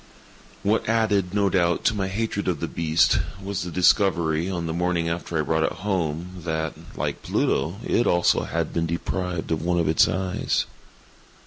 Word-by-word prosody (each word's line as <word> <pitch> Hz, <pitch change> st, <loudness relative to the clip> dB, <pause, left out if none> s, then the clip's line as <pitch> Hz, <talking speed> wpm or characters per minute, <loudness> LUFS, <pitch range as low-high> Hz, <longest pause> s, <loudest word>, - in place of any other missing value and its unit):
What 105 Hz, +2 st, +1 dB
added, 105 Hz, -5 st, +2 dB
no 100 Hz, 0 st, +2 dB
doubt, 85 Hz, -3 st, +1 dB
to -, -, +4 dB
my 95 Hz, -2 st, -1 dB
hatred 100 Hz, +1 st, -2 dB
of 85 Hz, -5 st, 0 dB
the -, -, -2 dB
beast, 80 Hz, 0 st, +2 dB, 0.2 s
was 100 Hz, -1 st, -3 dB
the 90 Hz, -, -4 dB
discovery, 85 Hz, -2 st, +2 dB
on 85 Hz, -3 st, -3 dB
the 80 Hz, -, -2 dB
morning 85 Hz, -1 st, 0 dB
after 85 Hz, 0 st, -3 dB
I 75 Hz, -, +1 dB
brought 80 Hz, +1 st, +1 dB
it -, -, +1 dB
home, 90 Hz, -2 st, -3 dB
that, 80 Hz, -2 st, -2 dB, 0.2 s
like -, -, -3 dB
Pluto, 80 Hz, +7 st, 0 dB
it 120 Hz, -, +2 dB
also 85 Hz, 0 st, +3 dB
had -, -, -2 dB
been 85 Hz, 0 st, 0 dB
deprived 85 Hz, +1 st, -3 dB
of 80 Hz, -, 0 dB
one 85 Hz, +1 st, 0 dB
of 85 Hz, -, +1 dB
its 80 Hz, 0 st, +5 dB
eyes. 95 Hz, -1 st, -1 dB
90 Hz, 180 wpm, -24 LUFS, 80-95 Hz, 0.2 s, its